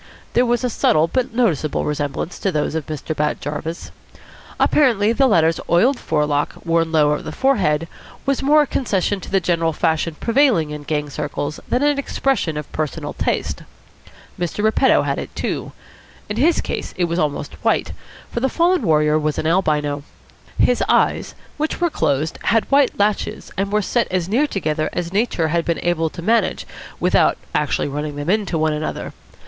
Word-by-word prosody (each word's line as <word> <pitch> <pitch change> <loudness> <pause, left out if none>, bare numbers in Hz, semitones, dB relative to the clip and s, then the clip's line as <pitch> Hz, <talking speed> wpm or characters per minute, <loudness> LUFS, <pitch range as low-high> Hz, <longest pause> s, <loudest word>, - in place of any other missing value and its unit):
There 245 +1 +3
was 240 +1 +1
a 250 - +1
subtle 155 -6 +3
but 255 +8 -1
noticeable 185 - 0
resemblance 150 +3 -3
to 195 - 0
those 150 -2 -1
of 160 -2 -3
Mr. 155 0 -4
Bat 150 0 0
Jarvis. 155 +3 -5 0.7
Apparently 230 -7 +3
the 270 +3 +3
latter's 165 -7 +3
oiled 240 +10 +3
forelock, 150 -2 0
worn 165 -1 +1
low 150 -2 +4
over 150 - -1
the - - -6
forehead, 170 - +1 0.4
was 275 -1 0
more 300 +2 +5
a - - -2
concession 205 -7 -1
to - - -10
the 195 - +2
general 165 -2 0
fashion 160 0 0
prevailing 230 - +2
in 150 0 -6
gang 150 0 -1
circles 150 0 -4
than 250 - +1
an 290 -1 +2
expression 265 - -1
of 150 - -6
personal 155 -2 -3
taste. - - -2 0.8
Mr. 175 +4 -2
Repetto 220 +5 +4
had - - -1
it, - - -7
too. - - -3 0.6
In 210 - -3
his 320 +7 +3
case - - -5
it 180 - +2
was 170 +1 -2
almost 150 -3 -2
white, - - +1 0.4
for - - -2
the 265 +2 +1
fallen 350 +4 +2
warrior 150 -1 +3
was 155 -1 -1
an - - -2
albino. 150 -4 +1 0.6
His 245 - +3
eyes, - - +2 0.2
which 310 +1 -2
were 345 -2 +1
closed, 155 - -1
had 225 +1 +3
white 275 -2 +3
lashes 205 +1 -1
and 195 +1 -2
were 210 0 +1
set 235 +4 +1
as 180 -2 -1
near 250 +10 +2
together 155 - -1
as 175 0 -3
Nature 200 -6 +1
had 170 +1 +1
been 170 0 -1
able 165 -2 +1
to 170 +1 -9
manage 225 0 +1 0.3
without - - +3 0.2
actually 150 -1 0
running 145 +1 -4
them 145 +4 -1
into 205 -5 0
one 155 0 +1
another. 150 +1 -4
170 Hz, 180 wpm, -20 LUFS, 155-235 Hz, 0.8 s, more